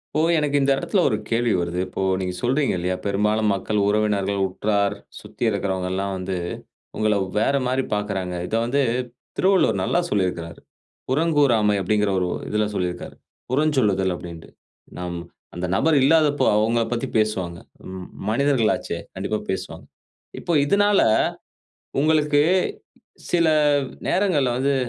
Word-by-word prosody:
இப்போ 155 - +3 0.2
எனக்கு 145 -1 0
இந்த 140 0 +2
இடத்துல 175 +6 0
ஒரு - - +1
கேள்வி 115 -1 +1
வருது. 85 +1 -2
இப்போ 90 - -5 0.2
நீங்க 90 -1 -3
சொல்றீங்க 135 +3 +1
இல்லயா? 90 +1 -1
பெரும்பாலும் 105 +2 +1
மக்கள் 105 +2 -1
உறவினர்கள், 100 -1 +1
உற்றார், 100 +1 0 0.2
சுத்தி 105 +2 -8
இருக்குறவங்க 95 -3 -2
எல்லாம் 100 +1 -2
வந்து 95 0 -3 0.6
உங்கள 110 -1 +2 0.2
வேற 115 +6 +2
மாரி 130 +1 0
பாக்குறாங்க. 100 -3 -2
இத - - -2
வந்து 140 +4 +1 0.6
திருவள்ளுவர் 185 - +3
நல்லா 135 - +1
சொல்லிருக்காரு. 90 -4 -2 0.5
புறங்கூறாமை 135 -8 +3
அப்படீங்கிற 105 +2 +1
ஒரு 90 - 0 0.2
இதுல 105 0 +1
சொல்லிருக்காரு. 90 -2 -3 0.4
புறஞ்சொல்லுதல் 125 -10 +2
அப்டீன்டு. 85 -2 -10 0.5
நம் 90 -1 -4 0.4
அந்த 90 +1 -3
நபர் 155 +7 +3
இல்லாதப்போ 150 0 +3
அவங்கள 115 +2 +2
பத்தி 120 - -2
பேசுவாங்க. 95 -6 -1 0.4
ம் 95 -1 -7 0.2
மனிதர்கள் 130 -1 +2
ஆச்சே. - - -5 0.2
கண்டிப்பா - - -2
பேசுவாங்க. - - -4 0.6
இப்ப - - -3
இதுனால 205 +5 +3 1.0
உங்களுக்கு, 150 -1 +3 0.9
சில 170 -2 +3 0.6
நேரங்கள்ல 160 -10 +2
வந்து, 140 +2 +1
110 Hz, 130 wpm, -23 LUFS, 95-140 Hz, 1.0 s, இப்போ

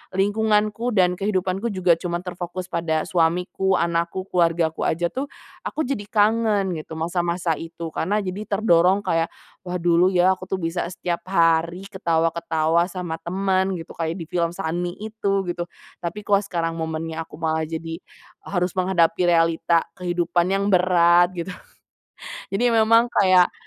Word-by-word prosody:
lingkunganku 215 +3 +1
dan 180 -1 +3
kehidupanku 195 +1 -1
juga 175 -3 +3
cuman 175 0 -3
terfokus 180 0 -6
pada 160 -2 0
suamiku, 180 +3 +1
anakku, 170 +2 -1
keluargaku 165 -2 +1
aja 170 +1 0
tuh, 275 +2 -3 0.4
aku 315 - -2
jadi 225 -7 -3
kangen 210 -2 +2
gitu, 160 +1 -9
masa-masa 170 +1 -1
itu. 165 0 -7
Karena 205 +6 -1
jadi 195 +3 -5
terdorong 195 -1 +3
kayak, 165 0 +1 0.4
wah 180 - -3
dulu 175 0 +3
ya 185 0 +4
aku 185 0 -4
tuh - - -1
bisa 170 -1 -2
setiap 175 -1 -3
hari 170 0 +2
ketawa-ketawa 165 -3 0 0.2
sama 175 -3 -5
teman 190 +2 0
gitu. 165 -2 -7
Kayak 165 0 -2
di - - -5
film 170 -1 0
Sunny 175 0 -3
itu, 210 -2 -1
gitu. 175 0 -3 0.3
Tapi 190 +5 -5
kok 200 -1 +3
sekarang 165 -3 -2
momennya 160 0 -4
aku - - -27
malah 160 -1 0
jadi, 165 +1 -5 0.4
e - - -16
harus 180 -1 0
menghadapi 180 -2 +2
realita 165 -1 +3 0.2
kehidupan 175 -1 0
yang 195 0 +1
berat, 175 -1 +4
gitu. 175 +1 -5 1.0
Jadi 195 +5 -1
memang 230 +1 +5
kayak, 185 -2 +4
175 Hz, 145 wpm, -23 LUFS, 165-195 Hz, 1.0 s, memang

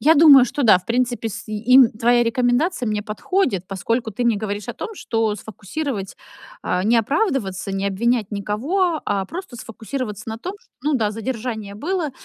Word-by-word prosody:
Я 315 +3 +5
думаю, 285 -4 +8
что 280 +3 -3
да, 215 -6 +6
в 185 - -19
принципе, 240 -1 0
с 205 - -7
им 235 +4 +5
твоя 240 +2 +3
рекомендация 245 +5 +1
мне 210 -1 -1
подходит, 215 - -1
поскольку 220 +4 -2
ты 245 - -3
не 230 -3 +3
говоришь 205 +1 -4
о 240 - -2
том, 445 - -6
что 225 - -1
сфокусировать 210 +1 -5 0.5
а, 180 +1 -1
не 230 +2 +4
оправдываться, 225 - 0
не 195 0 -2
обвинять 225 +2 0
никого, 285 - -1
а 200 -2 -1
просто 340 - -7
сфокусироваться 225 -1 -6
на 220 0 -5
том, 365 - -5
ш - - -29
ну 300 0 +1
да, 220 -5 +1
задержание 220 -2 -4
было, 320 - -2
230 Hz, 175 wpm, -21 LUFS, 210-275 Hz, 0.5 s, думаю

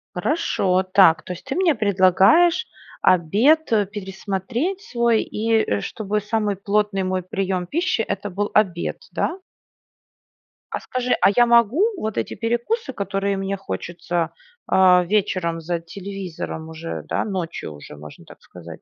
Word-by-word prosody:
Хорошо. 190 - +1
Так. 165 -5 +6
То 180 - -5
есть 180 - -12
ты 270 - -4
мне 350 -5 +3
предлагаешь 205 - +4 0.4
обед, 220 - +3
э, 210 -2 +3
пересмотреть 205 - -4
свой, 235 - +1
и, 225 +2 -2 0.2
э, 100 -1 0
чтобы 210 - -2
самый 210 -1 -1
плотный 200 0 0
мой 185 0 -1
прием 185 -1 -2
пищи 345 - 0
это 200 -1 -3
был 205 +2 -2
обед, 185 -5 +1
да? 355 - -1 1.3
А - - -2
скажи, 250 0 -3
а - - +6
я 240 - +6
могу 235 - +4 0.2
вот 220 - -4
эти - - -2
перекусы, 240 - -2
которые 200 -1 -2
мне 195 0 -2
хочется, 170 - -3 0.4
а, 180 -1 +5
вечером 185 -4 0
за 170 +1 -2
телевизором 180 -2 -7
уже, 160 +1 -6
да, - - -1
ночью 175 - -4
уже, 75 0 -11
можно 75 0 -12
так - - -16
сказать. 85 -2 -12
195 Hz, 145 wpm, -22 LUFS, 180-230 Hz, 1.3 s, Так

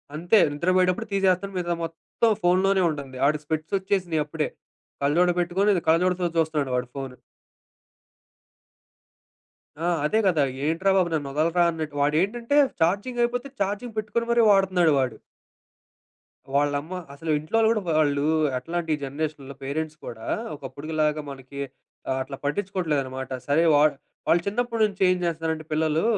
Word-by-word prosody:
అంతే 175 +7 +3 0.2
నిద్ర 170 +5 -1
పోయేటప్పుడు 185 +4 +2
తీసేస్తాను. 195 0 +1
మిగితా 175 -1 -1
మొత్తం 165 +7 -1
ఫోనులోనే 190 +2 +3
ఉంటుంది. 140 -4 -6
ఆడికి 150 0 0
స్పెక్ట్స్ 155 +5 -2
ఓచ్చేసినయి 185 -5 0
అప్పుడే. 150 0 -2 0.6
కళ్ళజోడు 175 +5 +3
పెట్టుకొని 185 +2 +2
కళ్ళజోడుతో 180 +2 +2
చూస్తున్నాడు 155 -4 0
వాడు 125 0 -1
ఫోను. 135 -2 -6 2.7
ఆ! - - +1 0.2
అదే 220 +8 +2
కదా! 160 -6 +3 0.2
ఏంట్రా 175 +5 +2
బాబు 180 -2 +3
నన్నోదల్రా 155 +4 +1
అన్నట్టు. 155 -2 -5
వాడేంటంటే 205 - +1 0.2
ఛార్జింగ్ 205 +9 +1
అయిపోతే 245 +3 -1
ఛార్జింగ్ 210 +4 -2
పెట్టుకొని 215 +2 -2
మరీ 235 0 +4
వాడుతున్నాడు 185 -5 +4
వాడు. 125 -4 -1 1.4
వాళ్ళమ్మ 145 +4 0 0.2
అసలు 155 +3 -4
ఇంట్లోళ్ళు 220 +9 +1
కూడా 215 -2 +1 0.2
వాళ్ళు 145 -2 +2 0.3
ఎట్లాంటే, 165 +5 -4
ఈ - - -8
జనరేషన్‍లో 140 -1 -5
పేరెంట్స్ 155 +2 -3
కూడా, 115 -1 -8 0.3
ఒకప్పుడుగులాగా 150 +3 -2
మనకి 135 +1 -10 0.5
ఆహ్, 130 0 0
అట్లా 135 0 -8
పట్టిచ్చుకోవట్లేదనమాట. 145 -7 -2 0.2
సరే 155 +4 +3
వా 145 - +5 0.5
వాళ్ళు 170 +1 +4
చిన్నప్పటి 230 +2 -1
నుంచి 200 -2 -5
ఏం 185 - +3
చేస్తున్నారంటే 160 -2 -2
పిల్లలు 155 +1 +1
165 Hz, 130 wpm, -25 LUFS, 145-190 Hz, 2.7 s, వా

